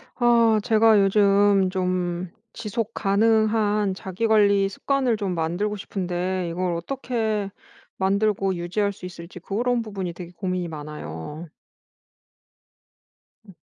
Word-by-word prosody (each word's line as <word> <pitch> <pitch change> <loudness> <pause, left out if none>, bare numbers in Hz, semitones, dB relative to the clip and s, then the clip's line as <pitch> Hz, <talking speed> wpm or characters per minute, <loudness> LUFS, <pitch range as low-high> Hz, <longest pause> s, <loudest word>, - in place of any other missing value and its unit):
아 235 -3 +4
제가 220 -2 +5
요즘 200 -1 +4
좀 180 -1 -2 0.2
지속 230 0 -4
가능한 210 0 +2
자기 190 +3 -4
관리 200 -2 +4
습관을 255 +2 0
좀 195 -4 -2
만들고 175 +6 -1
싶은데 185 -2 -3
이걸 175 +1 -1
어떻게 220 0 -2 0.5
만들고 195 0 +1
유지할 180 +4 -1
수 185 - -11
있을지 175 0 -9
그런 235 +6 -1
부분이 195 -5 -5
되게 175 0 -9
고민이 180 0 -3
많아요. 150 - -7 2.0
음. 195 - -15
195 Hz, 235 characters per minute, -24 LUFS, 180-215 Hz, 2.0 s, 제가